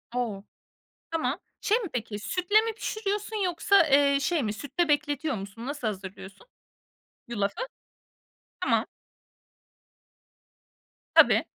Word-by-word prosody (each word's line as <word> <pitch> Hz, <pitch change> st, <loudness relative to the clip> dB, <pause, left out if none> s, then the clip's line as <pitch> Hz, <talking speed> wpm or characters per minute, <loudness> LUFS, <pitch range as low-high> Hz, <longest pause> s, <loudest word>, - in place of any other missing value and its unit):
O! 215 Hz, -5 st, -2 dB, 0.7 s
Tamam, 325 Hz, -1 st, -1 dB, 0.2 s
şey 435 Hz, +4 st, +3 dB
mi 420 Hz, -7 st, -4 dB
peki 220 Hz, -3 st, -3 dB
sütle 365 Hz, -, +2 dB
mi 450 Hz, 0 st, -2 dB
pişiriyorsun 430 Hz, -1 st, -3 dB
yoksa, 360 Hz, +3 st, +2 dB, 0.2 s
ııı, 280 Hz, -1 st, +4 dB
şey 320 Hz, 0 st, +1 dB
mi 210 Hz, -2 st, -1 dB
sütle 300 Hz, +9 st, -1 dB
bekletiyor 290 Hz, 0 st, +1 dB
musun 200 Hz, +5 st, -7 dB
nasıl 285 Hz, -4 st, -4 dB
hazırlıyorsun? 190 Hz, -, -8 dB, 0.8 s
Yulafı? 205 Hz, -, -1 dB, 1.0 s
Tamam. -, -, +2 dB, 2.3 s
Tabii. -, -, +7 dB
290 Hz, 105 wpm, -27 LUFS, -, 2.3 s, Tabii